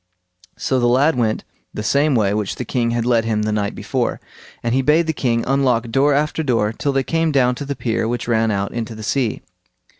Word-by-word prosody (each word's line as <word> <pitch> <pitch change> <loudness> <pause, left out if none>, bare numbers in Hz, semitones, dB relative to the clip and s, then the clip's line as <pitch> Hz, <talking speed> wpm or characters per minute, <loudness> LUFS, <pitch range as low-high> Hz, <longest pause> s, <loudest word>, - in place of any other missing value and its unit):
So 130 - 0
the 120 - +2
lad 135 +6 +3
went 115 -3 0 0.3
the 105 - -3
same 140 +5 +2
way 100 -3 +2
which 105 -2 -2
the 125 - -5
king 120 +1 0
had 120 0 -1
led 120 -2 +3
him 110 -2 0
the 110 - -1
night 105 -1 -1
before, - - -2 0.4
and 115 0 0
he 135 - +3
bade 150 +5 +3
the 160 - -1
king 115 -5 0
unlock 125 -4 +1
door 140 +3 +3
after 150 +2 0
door 115 -7 +1
till 140 +5 -1
they 135 -1 +1
came 165 +2 0
down 125 -3 +3
to - - -3
the 140 0 -3
pier 115 -3 -1
which 120 +1 -3
ran 115 -1 +2
out 100 -1 -1
into 115 -1 -4
the 110 - -8
sea. 125 0 -1
120 Hz, 230 wpm, -20 LUFS, 110-140 Hz, 0.4 s, lad